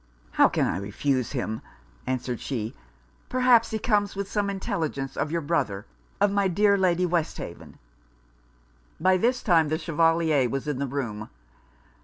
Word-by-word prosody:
'How - - +5
can - - +1
I - - -1
refuse 120 +6 -1
him?' 110 -4 -3 0.5
answered 125 -2 -2
she; 115 -5 -4 0.6
'perhaps 250 -2 +4
he 220 - -2
comes 205 -3 +1
with 200 0 -4
some 205 -1 0
intelligence 160 - -3
of - - -1
your 170 0 0
brother 140 -11 -1 0.3
of 205 - +3
my 200 -1 +2
dear 200 +3 +3
Lady 180 -2 +2
Westhaven.' 170 -2 -3 1.2
By 185 +3 +4
this 245 +6 +1
time 165 -7 +4
the 155 - 0
Chevalier 165 -4 +2
was 135 +4 -3
in 145 -3 -2
the 140 - -1
room. 120 -6 -4
165 Hz, 150 wpm, -26 LUFS, 135-200 Hz, 1.2 s, How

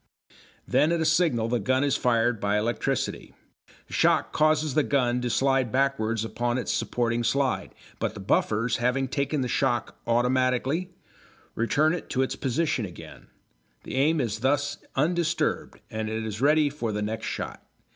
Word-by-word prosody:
Then 155 - +3
at 170 - +1
a 160 - 0
signal 155 -8 +2
the 120 +1 0
gun 130 +6 +1
is 140 -1 +2
fired 120 -2 +1
by 100 +1 +1
electricity. 115 +3 -2 0.5
The - - -13
shock - - +2
causes 155 -1 +2
the 155 - +3
gun 125 -4 +1
to 125 - -1
slide 135 -1 +1
backwards 115 -5 0
upon 120 +2 -1
its 125 - -2
supporting 120 -1 -1
slide, 135 +2 0 0.2
but 110 - -2
the - - -7
buffers, 110 +3 +1
having 125 +3 0
taken 140 +2 -1
the 125 - -1
shock 120 0 -1
automatically, 130 +7 +1 0.6
return 145 +7 +2
it 175 - -5
to 130 - +1
its 130 - -2
position 135 -1 -1
again; 90 -4 -10 0.6
the - - -8
aim 150 +4 +2
is 115 -5 -2
thus 145 +3 0 0.2
undisturbed 165 +3 0
and 110 0 -3
it 110 0 -3
is 110 +1 -5
ready 150 +2 +4
for 120 -6 -3
the 105 0 -2
next 110 +1 -3
shot. - - -5
125 Hz, 165 wpm, -26 LUFS, 115-145 Hz, 0.6 s, ready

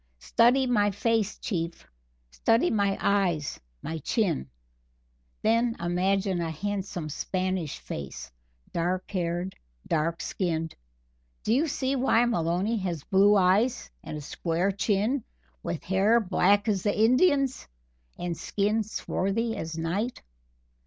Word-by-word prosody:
Study 245 - +3
my 210 -5 +3
face, 215 +1 0
Chief 170 -5 -4 0.5
study 225 - +2
my 200 -2 +1
eyes, 180 -7 +1 0.2
my 160 0 -4
chin. 155 - 0 0.9
Then 230 +1 +2
imagine 185 +2 +1
a 165 - -2
handsome 190 0 -3
Spanish 185 +1 -2
face 70 -3 -7 0.4
dark 180 +2 -1
haired, 175 0 -2 0.3
dark 165 +1 0
skinned. 165 -4 -2 0.7
Do 220 - +2
you 295 +7 +3
see 270 -2 -1
why 250 -3 +3
Maloney 185 +1 0
has 175 -7 -3
blue 200 +2 +5
eyes 195 - +2
and 150 - -6
a - - -6
square 170 +5 -1
chin 210 +6 0 0.4
with 160 - -4
hair 195 +5 +3
black 205 +1 +2
as 200 -4 +1
the 205 +1 0
Indian's 265 +3 +3 0.5
and 175 -1 -3
skin 210 +6 0
swarthy 220 +1 -2
as 165 0 -5
night? 190 +9 -2
195 Hz, 120 wpm, -27 LUFS, 170-225 Hz, 0.9 s, blue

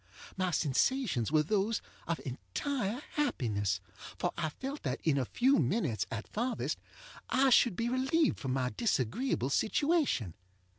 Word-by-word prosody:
My 185 -1 0
sensations 160 - +1
were 155 -1 +4
those 210 +5 +1 0.3
of 165 - -1
entire 200 - -3
happiness, 105 - 0 0.4
for - - 0
I 160 -2 -1
felt 270 - -6
that 130 -2 -2
in 145 -4 +2
a 130 - 0
few 260 - +3
minutes, 125 - 0
at 115 - -5
farthest, 240 +3 -2 0.5
I 265 0 +4
should 240 -4 +5
be 230 +5 -1
relieved 265 +6 +2
from 130 -2 -2
my 130 -1 0
disagreeable 170 - 0
situation. 280 - +1
185 Hz, 140 wpm, -32 LUFS, -, 0.5 s, should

